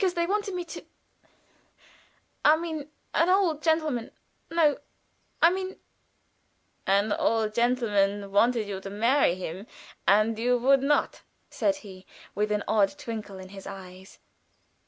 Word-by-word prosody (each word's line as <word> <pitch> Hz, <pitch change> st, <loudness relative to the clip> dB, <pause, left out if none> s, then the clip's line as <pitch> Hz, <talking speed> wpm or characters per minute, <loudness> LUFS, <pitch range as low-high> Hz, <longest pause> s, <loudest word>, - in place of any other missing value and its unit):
"They 340 Hz, 0 st, +1 dB
wanted 400 Hz, +1 st, -1 dB
me 355 Hz, -1 st, -3 dB
to 330 Hz, -, -9 dB, 1.6 s
I 305 Hz, +1 st, +6 dB
mean, 315 Hz, -3 st, -5 dB, 0.2 s
an 335 Hz, +2 st, +3 dB
old 365 Hz, -5 st, +2 dB
gentleman 310 Hz, -8 st, 0 dB, 0.4 s
no, 325 Hz, -3 st, +2 dB, 0.6 s
I 335 Hz, -, +8 dB
mean 375 Hz, 0 st, -4 dB, 0.6 s
" -, -, -32 dB
"An 205 Hz, +1 st, +1 dB
old 220 Hz, -1 st, +1 dB
gentleman 205 Hz, -5 st, +1 dB
wanted 225 Hz, +2 st, +2 dB
you 195 Hz, -1 st, -5 dB
to 195 Hz, -, -7 dB
marry 225 Hz, 0 st, +2 dB
him, 185 Hz, +3 st, -7 dB, 0.4 s
and 215 Hz, +2 st, +3 dB
you 245 Hz, +2 st, +2 dB
would 270 Hz, +2 st, +4 dB
not," 290 Hz, +2 st, +1 dB, 0.3 s
said 295 Hz, -, +1 dB
he, 190 Hz, -1 st, -12 dB, 0.3 s
with 210 Hz, +1 st, -1 dB
an 210 Hz, -1 st, 0 dB
odd 215 Hz, +5 st, +2 dB
twinkle 220 Hz, -7 st, -6 dB
in 185 Hz, 0 st, -10 dB
his 195 Hz, 0 st, -10 dB
eyes. 190 Hz, -1 st, -11 dB
230 Hz, 135 wpm, -27 LUFS, 200-305 Hz, 1.6 s, I